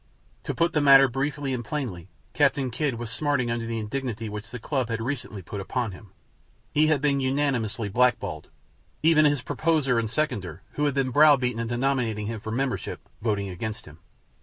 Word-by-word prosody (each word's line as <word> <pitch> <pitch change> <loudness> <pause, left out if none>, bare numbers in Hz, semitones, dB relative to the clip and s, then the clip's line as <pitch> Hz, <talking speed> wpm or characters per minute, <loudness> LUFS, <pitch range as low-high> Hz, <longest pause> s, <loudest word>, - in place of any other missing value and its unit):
To - - -3
put 170 +1 +1
the 150 - +2
matter 135 -1 +8
briefly 135 +2 -2
and 120 -2 -3
plainly, 110 - -4 0.3
Captain 140 -3 +2
Kidd 140 +1 -1
was 115 -1 -6
smarting 130 -2 0
under 115 -1 -2
the 115 0 -2
indignity 115 0 -3
which 105 +2 -7
the 125 - -6
club 130 0 -2
had 115 -1 -2
recently 115 -5 -4
put 100 +3 -6
upon 115 +2 -2
him. 95 +2 -13 0.6
He 155 +1 +4
had 155 -3 +2
been 140 -2 +2
unanimously 130 -5 0
blackballed, 105 -7 +1 0.5
even 155 -1 +5
his 145 -3 +2
proposer 145 -3 +1
and 115 -1 -2
seconder, 105 - -2
who 150 - -1
had 145 -2 0
been 135 -2 +1
browbeaten 135 -4 +5
into 115 +1 -2
nominating 120 -5 0
him 110 +1 -4
for 110 - -7
membership, 130 +2 -2 0.2
voting 105 -3 -1
against 105 +4 -5
him. 75 +1 -14
125 Hz, 185 wpm, -26 LUFS, 110-140 Hz, 0.6 s, matter